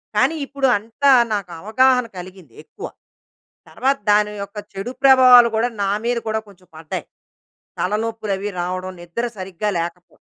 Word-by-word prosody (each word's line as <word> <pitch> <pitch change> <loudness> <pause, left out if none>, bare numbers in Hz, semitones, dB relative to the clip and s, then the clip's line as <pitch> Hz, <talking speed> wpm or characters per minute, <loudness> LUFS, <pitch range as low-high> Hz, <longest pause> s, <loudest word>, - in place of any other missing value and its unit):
కానీ 325 - +2
ఇప్పుడు 275 -1 -1
అంతా, 230 +7 +1 0.2
నాకు 195 -4 -3
అవగాహన 250 +4 +3
కలిగింది, 180 -8 -11
ఎక్కువ. 415 - -9 0.8
తర్వాత 275 +1 0
దాని 210 0 +3
యొక్క 200 +2 -12 0.2
చెడు 195 +6 -5
ప్రభావాలు 255 -3 +8
కూడా, 235 +2 +1
నా 195 - 0
మీద 240 0 0
కూడా, 220 0 -1
కొంచెం 185 -2 -20
పడ్డాయి. 160 -1 -6 0.7
తలనొప్పులవి 210 0 -2
రావడం, 185 +1 -4
నిద్ర 205 +8 -4
సరిగ్గా 190 +2 -4
లేకపో 175 +1 -6
210 Hz, 135 wpm, -20 LUFS, 185-245 Hz, 0.8 s, ప్రభావాలు